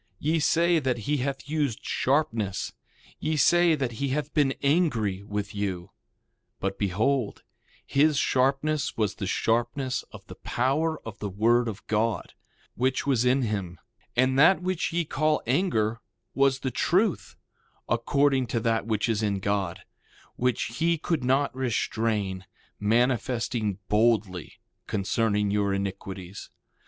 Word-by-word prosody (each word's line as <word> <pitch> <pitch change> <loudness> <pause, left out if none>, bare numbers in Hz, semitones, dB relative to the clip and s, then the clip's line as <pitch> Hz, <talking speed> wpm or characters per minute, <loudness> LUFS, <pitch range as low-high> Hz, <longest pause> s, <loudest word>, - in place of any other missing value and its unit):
Ye 160 +7 0
say 170 +2 +3
that 130 -4 0
he 150 0 +1
hath 135 +1 -3
used 145 -7 -2
sharpness; 125 -9 0 0.5
ye 155 0 -1
say 175 +2 +5
that 135 -5 -2
he 140 - +1
hath 145 +3 -2
been 140 -3 +2
angry 130 - +1
with 105 0 -4
you; 95 -4 -3 0.7
but 95 0 -3
behold, 110 +5 0 0.4
his 150 +1 +3
sharpness 140 +4 +1
was 105 -3 +1
the 100 - -5
sharpness 120 +5 0
of - - -12
the - - -10
power 150 +6 -1
of 110 -2 -8
the 105 - -3
word 115 +5 +2
of 110 -1 -6
God, 110 +1 -1 0.4
which 130 +2 0
was 130 -4 +2
in 130 +2 +3
him; 100 -6 -3 0.4
and 130 +2 +3
that 180 +5 +5
which 185 -1 -1
ye 170 0 0
call 155 +1 +1
anger 115 - +1 0.3
was 135 -1 +2
the 130 - -2
truth, 160 - +1 0.5
according 135 +3 +2
to 115 0 -1
that 115 -1 0
which 110 -1 0
is 110 -2 0
in 100 -2 0
God, 95 -2 -1 0.5
which 120 -1 -1
he 170 +1 +2
could 160 -3 -1
not 135 +2 +1
restrain, 110 -6 -1 0.3
manifesting 115 -1 0
boldly 105 -5 +1 0.3
concerning 105 0 0
your 100 -1 +1
iniquities. 95 -1 -6
120 Hz, 135 wpm, -26 LUFS, 105-140 Hz, 0.7 s, say